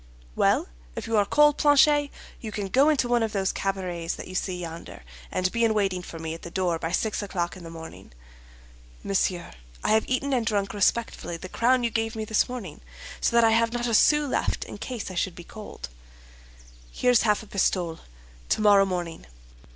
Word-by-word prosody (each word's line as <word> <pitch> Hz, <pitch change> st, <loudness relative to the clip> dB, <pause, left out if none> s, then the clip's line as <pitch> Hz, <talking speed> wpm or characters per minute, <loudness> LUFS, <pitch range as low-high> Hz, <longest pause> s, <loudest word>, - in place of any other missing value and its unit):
"Well, -, -, +2 dB, 0.3 s
if -, -, -5 dB
you 225 Hz, -, -1 dB
are 205 Hz, -1 st, +3 dB
cold, 295 Hz, +3 st, +4 dB
Planchet, 290 Hz, 0 st, +5 dB, 0.3 s
you 220 Hz, -, -6 dB
can 205 Hz, -2 st, -4 dB
go 275 Hz, +8 st, +4 dB
into 285 Hz, -5 st, +2 dB
one 240 Hz, -1 st, +2 dB
of 225 Hz, -1 st, -1 dB
those 195 Hz, -1 st, 0 dB
cabarets 180 Hz, -3 st, -3 dB
that -, -, -8 dB
you 185 Hz, -, -9 dB
see 185 Hz, -1 st, -2 dB
yonder, 165 Hz, -, -8 dB, 0.3 s
and 185 Hz, 0 st, 0 dB
be 235 Hz, 0 st, 0 dB
in 220 Hz, -1 st, +3 dB
waiting 195 Hz, -3 st, 0 dB
for 170 Hz, -, -9 dB
me 160 Hz, 0 st, -4 dB
at 165 Hz, -, -9 dB
the -, -, -8 dB
door 175 Hz, -2 st, -1 dB
by 165 Hz, -, -3 dB
six 215 Hz, +4 st, 0 dB
o'clock 180 Hz, -4 st, -3 dB
in 185 Hz, -, -11 dB
the 165 Hz, -, -8 dB
morning." 160 Hz, -, -10 dB, 0.9 s
"Monsieur, 185 Hz, -3 st, -1 dB, 0.3 s
I -, -, 0 dB
have 220 Hz, 0 st, +3 dB
eaten 270 Hz, +2 st, 0 dB
and 245 Hz, -3 st, +2 dB
drunk 205 Hz, -3 st, -1 dB
respectfully 205 Hz, -3 st, 0 dB
the 185 Hz, +2 st, -9 dB
crown 250 Hz, +4 st, +2 dB
you 235 Hz, -, 0 dB
gave 225 Hz, 0 st, -1 dB
me 220 Hz, -1 st, -3 dB
this 220 Hz, +2 st, +1 dB
morning, 235 Hz, -10 st, -7 dB, 0.4 s
so -, -, 0 dB
that 235 Hz, -, +6 dB
I 225 Hz, -, +5 dB
have 230 Hz, +1 st, +2 dB
not 240 Hz, 0 st, -1 dB
a 235 Hz, -, -1 dB
sou 295 Hz, +7 st, +5 dB
left 275 Hz, -, -1 dB
in -, -, -9 dB
case 240 Hz, -7 st, -5 dB
I -, -, -7 dB
should 180 Hz, 0 st, -1 dB
be 175 Hz, -, -10 dB
cold." 215 Hz, +3 st, -9 dB, 1.0 s
"Here's 245 Hz, -2 st, +3 dB
half 210 Hz, -1 st, +2 dB
a -, -, -12 dB
pistole. 180 Hz, -5 st, 0 dB, 0.5 s
Tomorrow 205 Hz, -2 st, +5 dB
morning." 175 Hz, -, -4 dB
205 Hz, 205 wpm, -26 LUFS, 180-235 Hz, 1.0 s, that